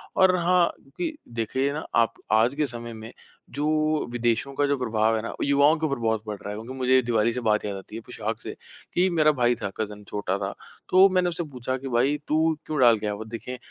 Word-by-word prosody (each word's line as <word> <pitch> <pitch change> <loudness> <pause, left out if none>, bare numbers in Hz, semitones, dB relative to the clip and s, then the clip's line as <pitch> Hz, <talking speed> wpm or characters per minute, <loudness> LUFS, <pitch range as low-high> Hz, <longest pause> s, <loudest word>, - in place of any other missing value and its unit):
और 190 -1 +5
हाँ, 175 0 +3
क्योंकि 305 - -5 0.2
देखिए 130 +5 -1
ना 155 - -5
आप 115 -1 +3 0.2
आज 115 +5 +3
के 150 0 +1
समय 120 -1 -7
में, 110 0 -9 0.4
जो 155 +1 0
विदेशों 120 +2 0
का 145 - +1
जो 140 0 +1
प्रभाव 110 -3 +1
है 110 - -1
ना, 115 - -5
वो - - -5
युवाओं 140 +2 +4
के 160 - -1
ऊपर 140 -3 -1
बहुत 110 -2 0
बढ़ 105 - -3
रहा 100 - -7
है। 105 - -4
क्योंकि 115 +4 -7
मुझे 130 0 +2
ये 130 - +6
दीवाली 115 -1 +2
से 125 - -2
बात 105 -2 +2
याद 100 -1 -3
आती 95 +2 -11
है, 115 - -5
पोशाक - - -4
से - - -7 0.4
कि 180 +2 +3
मेरा 155 -3 +4
भाई 120 0 +3
था 100 - -2
कज़िन 105 -1 -4
छोटा 100 -2 -2
था, - - -3 0.4
तो 190 +1 +7
मैंने 185 -1 +2
उससे 170 0 -3
पुछा 130 -3 -4
कि, 135 +1 -7
"भाई 130 +4 +2
तू 155 - +1 0.3
क्यों 155 -1 -3
डाल 120 -3 +6
के 105 - -5
आया 105 - -1
वो?" 110 +2 -7
देखें, 115 +3 -7
125 Hz, 245 wpm, -25 LUFS, 110-150 Hz, 0.4 s, तो